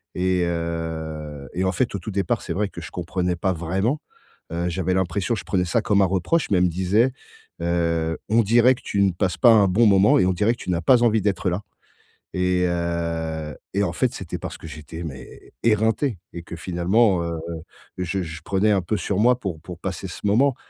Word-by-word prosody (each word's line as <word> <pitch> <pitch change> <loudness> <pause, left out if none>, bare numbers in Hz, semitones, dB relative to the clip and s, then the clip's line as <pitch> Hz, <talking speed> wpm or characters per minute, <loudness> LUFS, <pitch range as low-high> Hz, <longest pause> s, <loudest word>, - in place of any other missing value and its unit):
Et 90 0 +1
heu, 80 -3 -4
et 90 - -1
en 95 - +2
fait, 120 0 0
au 100 - -2
tout 105 +5 -6
départ, 100 +5 0
c'est - - -6
vrai 100 +2 0
que - - -9
je - - -9
comprenais 90 0 -2
pas 95 0 0
vraiment. 95 - -1 0.5
Heu, 85 +1 -1
j'avais 90 +1 -1
l'impression 95 +5 0
je - - -7
prenais 90 -2 +1
ça 85 - +1
comme 100 -1 +2
un 95 - +5
reproche. 95 - 0
Mais 95 - +4
elle 90 - +4
me - - +2
disait: 95 +9 +2 0.5
«Heu, 85 -1 0
on 115 +2 +4
dirait 120 +4 +5
que - - -16
tu 100 - 0
ne 95 -1 +4
passes 90 0 -1
pas 120 - +7
un 100 -3 +5
bon 115 +6 +4
moment 100 0 +5
et 95 - +4
on 95 - +2
dirait 105 +6 +2
que - - -10
tu - - -6
n'as 85 -1 0
pas 120 +7 +5
envie 110 -2 +3
d'être 95 -2 0
là». 90 +4 -2 0.7
Et 90 0 +1
heu, 85 -3 -2 0.2
et 100 - +2
en - - -1
fait, 130 -3 0
c'était 95 - -6
parce - - -6
que - - -13
j'étais, 80 +2 -8
mais, 70 -5 -10
éreinté 110 +1 +2 0.2
et 85 - -6
que, 85 - -8
finalement, 90 +3 +2
heu, 85 -1 -3 0.6
je 90 +1 -1
je 80 +1 -7
prenais 100 +2 +2
un 95 -2 +3
peu 105 +5 -1
sur 100 -1 -1
moi 125 +3 +4
pour 85 -8 -5
pour 90 -1 -9
passer 95 +1 -4
ce 90 - -9
moment. 120 +6 +3
90 Hz, 220 wpm, -23 LUFS, 85-105 Hz, 0.7 s, pas